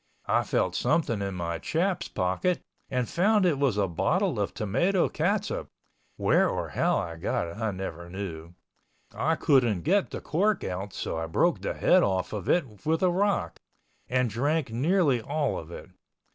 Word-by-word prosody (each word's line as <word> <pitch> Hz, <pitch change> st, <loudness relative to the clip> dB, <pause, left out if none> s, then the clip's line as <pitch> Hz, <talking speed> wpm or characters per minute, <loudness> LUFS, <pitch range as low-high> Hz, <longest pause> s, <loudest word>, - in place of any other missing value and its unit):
I -, -, +2 dB
felt -, -, 0 dB
something 115 Hz, -11 st, +1 dB
in 100 Hz, -1 st, -3 dB
my 85 Hz, -1 st, -3 dB
chaps 175 Hz, -, -1 dB
pocket, 95 Hz, -, 0 dB, 0.3 s
and 125 Hz, -3 st, -1 dB
found 205 Hz, +2 st, +3 dB
it 155 Hz, -6 st, +2 dB
was 135 Hz, -7 st, +2 dB
a 100 Hz, -2 st, +2 dB
bottle 85 Hz, -, 0 dB
of -, -, -1 dB
tomato 170 Hz, -, +1 dB
catsup 195 Hz, +6 st, -1 dB, 0.5 s
(where -, -, +3 dB
or -, -, -3 dB
how -, -, +1 dB
I 85 Hz, -1 st, -4 dB
got 80 Hz, -, -1 dB
it 85 Hz, -, -9 dB
I 110 Hz, -1 st, -1 dB
never 85 Hz, -3 st, -6 dB
knew). 85 Hz, -3 st, -7 dB, 0.6 s
I 160 Hz, +3 st, +1 dB
couldn't 125 Hz, -, +2 dB
get 190 Hz, +6 st, +2 dB
the -, -, -5 dB
cork 200 Hz, +5 st, 0 dB
out 95 Hz, +2 st, -4 dB
so 80 Hz, -, -4 dB
I 80 Hz, -, -3 dB
broke 80 Hz, -, +1 dB
the -, -, -3 dB
head -, -, +4 dB
off 95 Hz, -1 st, 0 dB
of 105 Hz, -4 st, -4 dB
it 120 Hz, -, 0 dB
with 160 Hz, +3 st, +1 dB
a 180 Hz, -, +4 dB
rock, 195 Hz, -, 0 dB, 0.5 s
and 125 Hz, 0 st, +2 dB
drank 140 Hz, +5 st, 0 dB
nearly 140 Hz, 0 st, +2 dB
all 145 Hz, +4 st, -1 dB
of 80 Hz, -, -10 dB
it. 85 Hz, -, -10 dB
125 Hz, 175 wpm, -27 LUFS, -, 0.6 s, head